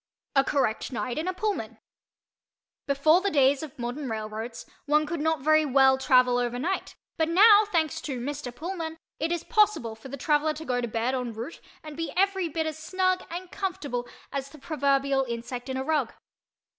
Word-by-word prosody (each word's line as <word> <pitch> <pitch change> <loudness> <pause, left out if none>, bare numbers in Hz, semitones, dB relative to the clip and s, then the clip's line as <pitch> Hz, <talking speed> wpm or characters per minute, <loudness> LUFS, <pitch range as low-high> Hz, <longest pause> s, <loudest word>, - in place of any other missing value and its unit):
A 270 - +6
CORRECT 270 -4 0
NIGHT 250 +2 -3
IN 325 - -3
A 370 - 0
PULLMAN 420 +1 -2 1.1
Before 310 +5 +4
the 400 - +1
days 275 -4 +3
of 310 -4 -8
modern 245 +3 -4
railroads 220 +1 -5 0.2
one 300 +1 +3
could 335 +2 -3
not 320 -2 +1
very 310 +2 +4
well 265 -2 +4
travel 250 -2 +4
over 245 0 -1
night 350 +9 -2 0.2
but 320 0 +1
now, 415 +4 +7
thanks 330 -7 0
to 270 -4 -4
Mr. 270 0 -4
Pullman, 325 +2 -5 0.2
it 320 +2 -1
is 345 -1 -1
possible 420 - +2
for 220 +4 -12
the 280 - -6
traveller 300 +3 +2
to 315 +1 -8
go 250 -3 0
to 240 - -2
bed 230 +3 -1
en 250 -3 -2
route 235 +9 -7 0.2
and 305 -1 -8
be 330 +1 -3
every 385 -2 +2
bit 320 +1 -2
as 315 0 -4
snug 370 +2 0
and 355 +1 -6
comfortable 300 -11 -3 0.2
as 275 -1 -4
the 305 - -14
proverbial 275 -2 +1
insect 245 +1 -5
in 260 - -2
a 265 - -2
rug. 290 -5 0
290 Hz, 190 wpm, -27 LUFS, 255-330 Hz, 1.1 s, now